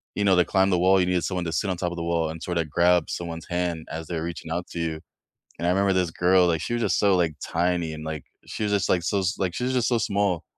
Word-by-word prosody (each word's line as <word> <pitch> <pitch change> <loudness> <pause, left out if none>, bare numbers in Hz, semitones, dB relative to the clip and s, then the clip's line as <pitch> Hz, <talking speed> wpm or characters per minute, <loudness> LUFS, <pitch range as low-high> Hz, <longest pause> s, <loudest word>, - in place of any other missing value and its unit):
you 105 - 0
know, 95 -2 +4
they 90 -1 +4
climb 95 0 +2
the 90 - +2
wall, 95 +2 +4
you 90 - +3
needed 90 -2 +1
someone 90 -2 -2
to 80 - -2
sit 100 +4 0
on 95 - 0
top 90 0 -2
of 85 - -6
the 85 - -3
wall 85 -1 0
and 80 0 -7
sort 90 -1 -2
of 80 -2 -2
grab 90 +3 +3
someone's 85 -2 -5
hand 85 -2 -2
as 80 0 -5
they're 80 -2 -3
reaching 85 -1 -6
out 85 +2 -3
to 85 - -6
you, 80 -1 -2 0.6
and 85 - -2
I - - +3
remember 95 +1 +2
this 90 -3 +1
girl, 90 +1 +3
like, 80 -2 +1
she - - -4
was 120 - -1
just - - +1
so, 100 -2 +4
like, 85 -3 +1
tiny, 85 -1 0
and, 75 0 -8
like, 80 -2 -5 0.2
she - - -6
was 105 - 0
just, 100 -2 +1
like, 90 - +2
so 100 +4 0
s 95 +1 -1
like 90 -3 -1
she's 125 +5 -1
just 120 -2 +2
so 120 - +2
small, 100 -5 0
90 Hz, 300 wpm, -25 LUFS, 85-95 Hz, 0.6 s, know